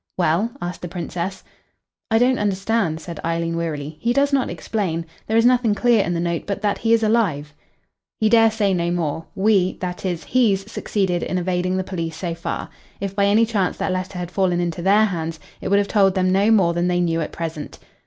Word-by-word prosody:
"Well?" 180 +5 +2
asked 175 +1 -5
the 175 - -4
Princess. 175 +2 -5 0.7
"I 225 - +3
don't 255 +2 +3
understand," 195 -4 0
said 165 -1 -8
Eileen 165 0 -1
wearily. 155 -2 -4
"He 235 +1 +1
does 280 +2 +2
not 270 -2 +2
explain. 170 -7 -3 0.2
There 220 - +1
is 230 - +4
nothing 245 -4 +3
clear 235 -2 +3
in 175 - -2
the - - -1
note 170 -1 -2
but 200 -1 -2
that 205 -1 0
he 225 - 0
is 230 -1 +4
alive." 185 -10 +1 0.7
"He 220 - +3
dare 225 0 +6
say 210 -3 0
no 170 -1 0
more. 165 -2 -2
We 195 -2 +3
that 180 -1 -5
is 175 -4 -2
he's 210 -4 +1
succeeded 190 -7 -1
in 185 - -2
evading 180 +1 0
the 190 - -1
police 165 -4 -4
so 170 0 -3
far. 165 0 -4 0.3
If 195 0 -4
by 200 0 +3
any 215 +3 +4
chance 205 -5 -1
that 185 - -1
letter 185 0 -4
had 175 -1 -5
fallen 185 -2 +1
into 170 -1 -2
their 205 +4 +4
hands, 165 -5 -3 0.2
it - - -4
would 200 +1 +3
have 200 0 +2
told 195 -3 +3
them 185 -1 +2
no 200 +3 +3
more 190 -6 +4
than 175 +1 0
they 180 0 +1
knew 165 -2 +1
at 155 - -4
present." 160 -2 -6
185 Hz, 215 wpm, -21 LUFS, 170-210 Hz, 0.7 s, dare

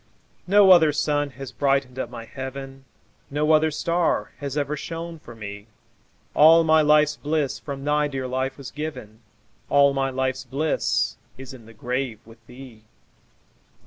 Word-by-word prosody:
No 200 0 +6
other 160 -4 +7
sun 145 0 0
has 135 -1 -7
brightened 135 -2 0
up - - -3
my 115 - -9
heaven, 135 +1 -8 0.4
No 150 +2 0
other 155 0 +4
star 170 +3 -1
has 140 0 -5
ever 145 +1 -1
shone 165 +2 -7
for 120 -5 -13
me; 100 -1 -9 0.7
All 165 +2 +7
my 160 -1 +4
life's 150 0 +3
bliss 145 -3 -2
from 140 -2 -7
thy 150 +1 +1
dear 135 -2 -4
life 130 +1 -3
was 140 -3 -9
given, 145 -8 -7 0.5
All 140 0 +4
my 135 0 0
life's 130 0 -2
bliss 140 +5 -1 0.2
is 135 0 -10
in 120 -4 -14
the 115 - -14
grave 125 0 -3
with 115 0 -17
thee. 125 -3 -13
140 Hz, 155 wpm, -23 LUFS, 130-150 Hz, 0.7 s, other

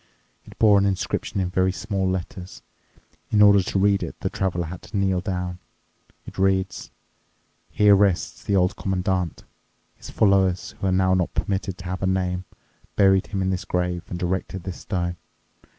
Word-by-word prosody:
It - - -15
bore 105 -2 +5
an 100 - +2
inscription 95 +1 -2
in 90 -1 -1
very 95 +1 +2
small 95 +1 -2
letters. 95 0 -5 0.7
In 105 - +2
order 100 -1 +7
to 95 - -2
read 100 0 +3
it - - -6
the - - -2
Traveler 90 -3 -1
had 85 +2 -8
to 105 - -6
kneel 95 -2 +1
down. 90 -1 -4 0.7
It - - -10
read, 95 0 +1 0.9
"Here 105 -1 +5
rests 100 -3 +1
the 100 - 0
Old 95 +2 +2
Commandant. 95 -3 -2 0.5
His - - -11
followers, 95 -3 +2
who 95 - -1
are - - +2
now 95 0 +3
not 90 -2 0
permitted 95 -1 -2
to 90 - -11
have 95 +1 -4
a 95 - 0
name, 90 -1 -1 0.5
buried 95 -1 +4
him 95 -2 -2
in 95 - 0
this 95 0 -2
grave 90 -1 -1
and 90 - -5
erected 95 0 -2
this 95 -1 -6
stone. 85 -2 -3
95 Hz, 175 wpm, -23 LUFS, 90-95 Hz, 0.9 s, order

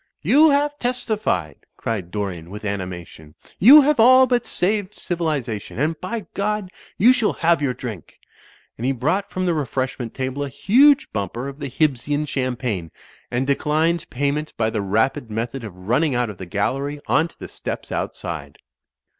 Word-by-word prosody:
"You 310 +3 +6
have 290 +1 +1
testified," 215 - -1 0.2
cried 100 -6 -3
Dorian 90 -4 -4
with 105 +2 -8
animation. 90 -6 -6 0.2
"You 275 +10 +10
have 290 -2 +2
all 255 +3 +8
but 245 -1 0
saved 205 +2 -1
civilization. 150 - -3
And 150 +4 -1
by 225 +5 -3
Grod, 210 -1 -2 0.3
you 240 +6 +6
shall 240 -4 +1
have 165 -1 +2
your 130 -3 0
drink." 110 - -8 0.6
And 120 - -3
he 135 - +2
brought 165 +11 -1
from 185 0 -2
the 175 - +2
refreshment 130 -5 -3
table 130 +2 -3
a 140 - -4
huge 265 - +4
bumper 110 +5 -3
of 140 +1 -8
the 140 - -4
Hibbsian 145 +2 0
champagne, 125 - -2 0.4
and 125 +2 -1
declined 155 +4 0
pay 140 +2 0
ment 150 +1 -4
by 110 -1 +1
the 110 - -1
rapid 110 +6 0
method 115 +4 -4
of 105 -4 -7
rtmning 120 - 0
out 120 -2 0
of 95 - -14
the 95 - -7
gal 100 +5 0
lery 140 +2 -4
on 160 - +2
to - - -22
the - - -8
steps - - -6
outside. 75 -5 -5
140 Hz, 170 wpm, -22 LUFS, 110-185 Hz, 0.6 s, You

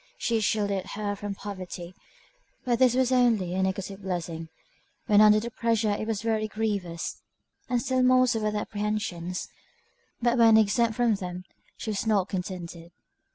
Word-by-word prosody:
She 230 -1 0
shielded 200 -2 0
her 205 -1 -2
from 200 0 -5
poverty; 185 -3 -7 0.7
but 240 -2 +1
this 255 -2 +5
was 260 -1 +2
only 230 -8 +3
a 190 - 0
negative 190 +1 -2
blessing; 170 -3 -4 0.6
when 210 -3 +5
under 215 0 +7
the 235 +2 -5
pressure 225 -2 +1
it 210 +1 -2
was 220 -1 -2
very 220 -1 0
grievous, 200 -6 -3 0.5
and 250 -1 +2
still 260 0 0
more 255 0 +5
so 240 -3 +1
were 215 0 0
the 210 - -2
apprehensions; 205 -5 -3 0.7
but 240 0 +1
when 225 -1 +7
exempt 220 +1 +2
from 240 -1 +3
them, 180 -2 -5 0.3
she 220 - -4
was 210 +2 -2
not 200 -3 +2
contented. 175 -2 -6
210 Hz, 160 wpm, -27 LUFS, 190-230 Hz, 0.7 s, under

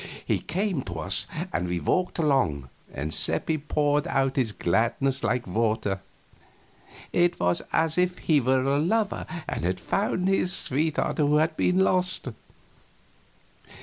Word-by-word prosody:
He - - 0
came 185 -3 -2
to 90 - -6
us, 80 - +3 0.3
and 90 - -1
we 90 0 -2
walked 185 - 0
along 130 - +1 0.2
together, - - -8
and 75 +2 -3
Seppi 160 -1 +2
poured 145 +1 0
out 135 -3 0
his 125 -5 +1
gladness 120 +9 0
like 120 +1 0
water. 110 0 -1 1.1
It 175 0 +2
was 90 0 +1
as 160 +1 +1
if 180 0 +1
he 150 -3 +2
were 130 +1 +2
a 140 +1 +1
lover 205 +6 0 0.2
and - - -4
had 90 +1 -1
found 195 -2 -1
his 190 -1 +1
sweetheart 150 +1 -1
who 150 0 +3
had 155 +1 +2
been 180 +3 +1
lost. 185 -6 +1
145 Hz, 150 wpm, -26 LUFS, 110-175 Hz, 1.1 s, us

